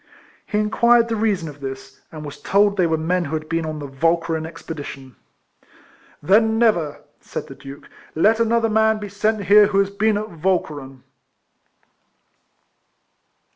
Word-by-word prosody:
He 210 - -2
inquired 235 +2 +3
the 225 - 0
reason 205 -6 0
of 145 -1 -10
this, 135 0 -8
and 155 -1 -8
was 145 - -9
told 200 0 +2
they 180 -3 +2
were 160 -1 0
men 175 +3 0
who 155 +2 -3
had 155 0 -5
been 165 0 -2
on 155 -1 -4
the 145 - -6
Walcheren 165 +3 0
expedition. 145 -5 -9 1.1
"Then 220 +6 +3
never," 190 -11 +1 0.2
said - - -6
the - - -10
Duke, 140 +1 -12 0.3
"let 215 +8 +3
another 230 0 +2
man 220 0 +2
be 210 -1 -7
sent 210 +1 -1
here 205 +1 +6
who 200 -1 -1
has 200 0 +2
been 210 +1 +1
at 215 +1 -5
Walcheren." 145 -8 -2
185 Hz, 155 wpm, -21 LUFS, 155-215 Hz, 1.1 s, here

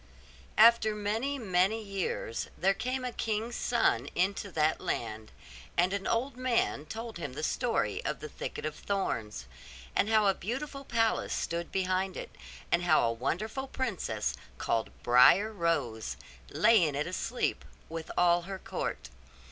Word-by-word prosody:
After 220 -1 +6
many, 220 +7 -1
many 195 -1 +2
years 195 - -3
there 195 +2 +3
came 255 +5 -3
a 250 - -2
king's 225 +1 -2
son 145 - +1
into 195 +2 0
that 155 0 +2
land: 110 -1 -3 0.5
and 180 +3 +3
an 200 -1 -2
old 245 +3 0
man 245 - 0
told 225 0 -6
him 145 -6 -5
the 155 - -5
story 190 - 0
of - - -2
the 150 - -6
thicket 150 - -6
of 155 - -2
thorns; 110 - -2 0.5
and 210 - +2
how 215 -1 +4
a 195 - +5
beautiful 275 +9 -5
palace 225 -3 +1
stood 170 0 -3
behind 185 0 0
it, - - -7 0.4
and 175 - +3
how 175 - +4
a 115 -1 +2
wonderful 215 - -2
princess, 190 - -2 0.2
called 115 -1 0
Briar 125 - +6
Rose, 150 - -1 0.3
lay 230 -3 +5
in 150 -3 0
it 145 +2 0
asleep, 205 +7 -2 0.2
with 165 0 -6
all 175 0 +5
her 195 - -3
court. 125 - -4
195 Hz, 150 wpm, -30 LUFS, 155-225 Hz, 0.5 s, After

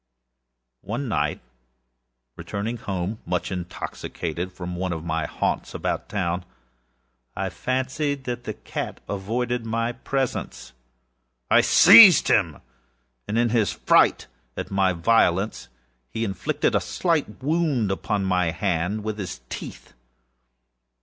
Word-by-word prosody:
One 120 +7 -4
night, 110 - -1 0.9
returning 110 +4 -4
home, 100 0 -4
much 90 +2 -2
intoxicated, 90 -1 -5
from 90 -1 -6
one 90 0 -2
of 80 -1 -6
my 80 -1 -1
haunts - - -2
about - - -3
town, 90 -2 -2 0.9
I - - -2
fancied 130 +2 -2
that 120 -1 -5
the 110 - -4
cat - - -6
avoided 115 +5 -2
my 115 +1 -1
presence. 130 - -4 0.8
I - - +7
seized 190 -9 +8
him; 85 -9 +2 0.6
when, 105 - -2
in 120 0 +3
his 110 -3 +2
fright - - +3 0.3
at - - -5
my 95 -1 +2
violence, 95 +2 +1 0.4
he 110 - -3
inflicted 95 -3 -1
a - - +2
slight 165 -6 -1
wound 145 - +1
upon 100 0 -1
my 90 -2 +1
hand 90 +4 -1
with 110 0 -4
his 90 -10 -6
teeth. - - -8
105 Hz, 120 wpm, -24 LUFS, 90-120 Hz, 0.9 s, seized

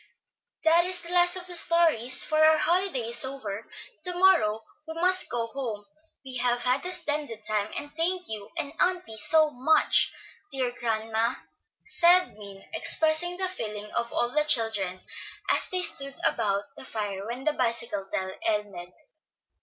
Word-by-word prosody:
"That 335 +2 +5
is 365 0 0
the 340 +1 -6
last 355 0 +5
of 365 -1 -3
the 360 -1 -4
stories, 325 -8 +5
for 310 0 +2
our 315 0 +6
holiday 340 -9 0
is 235 +3 +1
over, 260 -7 -5
and 225 - -20 0.4
to 360 -1 -2
morrow 280 - +3 0.2
we 320 - -7
must 365 +2 +4
go 235 -1 -2
home. 230 -4 -6 0.4
We 260 -1 -5
have 245 0 0
had 255 +2 +1
a - - 0
splendid 290 -10 -3
time, 215 0 -2
and 290 +1 -7
thank 355 +3 -1
you 210 -2 -6
and 295 -3 -4
auntie 360 -11 0
so 310 +7 +3
much, 275 +5 +3 0.4
dear 260 -3 -1
grandma," 225 -1 -1 0.5
said 355 - +3
Min, 200 -2 -13
expressing 330 +2 +1
the 375 0 0
feeling 210 - -6
of 235 0 -2
all 240 - 0
the 300 +4 +1
children, 215 -9 0 0.5
as - - +1
they 365 -1 +1
stood 275 -3 -2
about 200 -3 0
the - - -8
fire 205 -2 -5
when 245 +3 -6
the 310 - +1
bicycle 230 -6 -2
tale 190 0 -3
ended. 205 -5 -3
260 Hz, 165 wpm, -26 LUFS, 220-335 Hz, 0.5 s, our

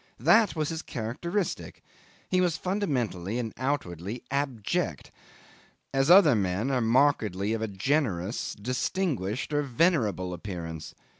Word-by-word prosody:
That 220 -4 +4
was 155 -2 -1
his 160 -1 -3
characteristic; 170 - -3 0.4
he 185 0 +2
was 175 -3 +1
fundamentally 125 - -1
and 115 -3 -3
outwardly 120 - -3
abject, 135 -6 -2 0.8
as 135 +2 +2
other 175 -6 +8
men 100 +4 0
are 130 -2 +1
markedly 110 -5 +2
of 115 - -2
a 110 - -1
generous, 100 - -1
distinguished, 125 - -2
or 145 - +2
venerable 120 - +1
appearance. 85 -3 -6
125 Hz, 120 wpm, -28 LUFS, 100-150 Hz, 0.8 s, other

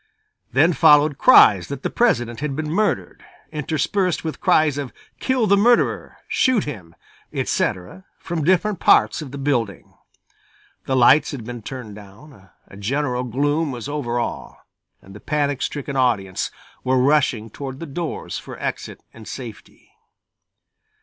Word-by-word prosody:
Then 155 +7 +4
followed 150 -1 +5
cries 100 - +6
that 140 -1 -7
the - - -2
President 120 - +1
had 145 -1 -3
been 155 0 -3
murdered, 210 +5 -1 0.3
interspersed 160 +5 -1
with 160 -1 -5
cries 150 -2 +3
of 140 -3 -5 0.3
"Kill 260 -3 +1
the 200 -1 +4
murderer!" 235 +4 +2
"Shoot 255 -6 +2
him!" 90 - -8 0.4
etc., 150 - -2
from 165 -3 -4
different 185 +3 +1
parts 105 -4 +4
of 150 - -7
the 140 - -8
building. 120 - -2 0.9
The 130 - 0
lights 135 +4 +5
had 135 -5 -6
been 120 +1 -7
turned 120 -2 -8
down, 100 +1 -15 0.2
a 100 - -14
general 125 +4 -1
gloom 145 +5 0
was 120 0 -6
over 140 -5 -3
all, 120 - -5 0.4
and 95 - -14
the 105 - -11
panic 145 -1 -1
stricken 140 -1 -4
audience 105 -8 0 0.3
were 130 0 +1
rushing 125 -5 +2
toward 135 +1 -7
the 165 - -6
doors 165 +2 -5
for - - -10
exit - - -5
and 115 -1 -13
safety. 120 -5 -10
140 Hz, 145 wpm, -21 LUFS, 120-155 Hz, 0.9 s, cries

